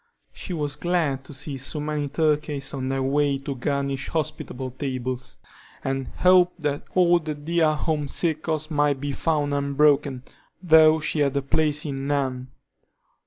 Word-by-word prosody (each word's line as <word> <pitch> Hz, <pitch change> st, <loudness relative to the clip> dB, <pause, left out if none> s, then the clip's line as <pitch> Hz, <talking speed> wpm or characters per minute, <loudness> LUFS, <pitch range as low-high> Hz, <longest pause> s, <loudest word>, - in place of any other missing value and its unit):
She -, -, -7 dB
was 150 Hz, -4 st, -2 dB
glad 155 Hz, -5 st, 0 dB
to -, -, -11 dB
see 135 Hz, 0 st, -6 dB
so 150 Hz, +4 st, -3 dB
many 150 Hz, -1 st, -2 dB
turkeys 150 Hz, -1 st, -1 dB
on 130 Hz, -1 st, -3 dB
their 135 Hz, 0 st, -1 dB
way 140 Hz, +1 st, +2 dB
to 135 Hz, +1 st, -5 dB
garnish 140 Hz, 0 st, -2 dB
hospitable 145 Hz, -5 st, -3 dB
tables, 130 Hz, -1 st, -4 dB, 0.5 s
and 135 Hz, -1 st, -2 dB
hoped 180 Hz, -1 st, +4 dB
that 145 Hz, -1 st, -1 dB
all 175 Hz, -1 st, +5 dB
the 155 Hz, -2 st, -4 dB
dear 155 Hz, +1 st, +1 dB
home 150 Hz, -1 st, -1 dB
circles 155 Hz, 0 st, -1 dB
might 145 Hz, -2 st, +2 dB
be 145 Hz, +1 st, -3 dB
found 145 Hz, 0 st, 0 dB
unbroken, 140 Hz, -2 st, +2 dB, 0.4 s
though 160 Hz, -2 st, +6 dB
she 150 Hz, -, -1 dB
had 140 Hz, -1 st, 0 dB
place 150 Hz, -1 st, +1 dB
in 135 Hz, -2 st, -4 dB
none. 130 Hz, -3 st, -1 dB
145 Hz, 150 wpm, -24 LUFS, 135-155 Hz, 0.5 s, though